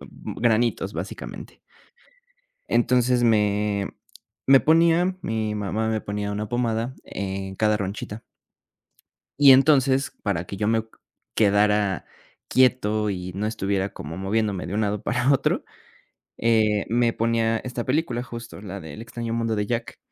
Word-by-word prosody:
granitos, 115 0 -1
básicamente. - - -7 1.1
Entonces, 125 +1 +2
me 105 -3 +2 0.6
me 135 0 +7
ponía 170 +3 +3
mi 110 -1 -2
mamá 105 +2 -2
me 110 -1 0
ponía 105 0 -3
una 105 0 -3
pomada 120 0 -1
en 95 0 -5
cada 105 -1 +2
ronchita. 105 +2 -5 1.2
Y 145 -1 +8
entonces, 135 0 +4
para 90 -5 -1
que 100 - -6
yo 105 +2 0
me 115 0 +2
q 110 - -25 0.4
quedara 105 -2 +2 0.4
quieto 110 -5 +2
y 90 -1 -5
no 105 +2 -2
estuviera 100 -2 -1
como 80 +3 -7
moviéndome, 100 0 -1
de 95 - -5
un 110 - +1
lado 105 0 -1
para 125 +3 +1
otro, 135 - +1 0.7
eh, 110 -3 +2
me 120 0 +2
ponía 115 0 +1
esta 125 0 -5
película, 130 -3 0
justo, 115 -4 -9
la 100 -1 -6
de 80 -4 -9
El 110 - -8
extraño 115 -1 -5
mundo 115 -1 -1
de 105 - -1
Jack. 115 0 -3
110 Hz, 140 wpm, -24 LUFS, 100-120 Hz, 1.2 s, Y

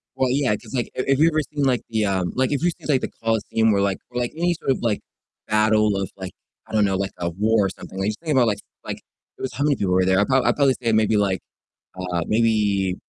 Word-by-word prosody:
Well, 130 -1 +1
yeah, 130 -6 +2
'cause - - -12
like 120 -2 -1
if 130 - -2
if 135 +1 +3
you've 165 +1 +5
ever 155 0 +1
seen, 145 -1 -1
like, 130 -3 +2
the, 110 -2 0
um 95 -3 0
like, 130 +2 +1
if 145 - 0
you've 175 -1 +2
seen, - - -11
like, 135 -3 +3
the - - -3
Colosseum 110 0 +1
where, 100 -1 +2
like 100 -1 +1
or, 125 - -3
like, 120 - -1
any 175 +1 +1
sort 135 - 0
of, - - 0
like, 115 -4 0 0.5
battle 110 -1 +3
of, 95 -1 -2
like 95 -1 -6 0.4
I - - -13
don't 105 -1 +4
know, 95 -1 +1
like, 100 0 -2
a 85 0 -2
war 105 +3 +2
or - - 0
something, 95 - -10
like, 100 +2 0
just 110 - -5
think 160 -2 -4
about 125 -3 +4
like 105 -2 0 0.3
like - - -4 0.4
it - - -13
was 130 - -3
how 145 - -2
many 145 -1 +3
people 95 -6 0
were 95 0 +3
there? 95 0 +3
I 100 - +3
prob 130 +2 +2
I'd - - +3
probably 140 -3 +3
say 115 -1 +1
maybe, 110 -1 +3
like 95 -3 +1 0.6
uh, 90 -2 -2
maybe 105 -4 +2
110 Hz, 275 wpm, -22 LUFS, 100-130 Hz, 0.6 s, you've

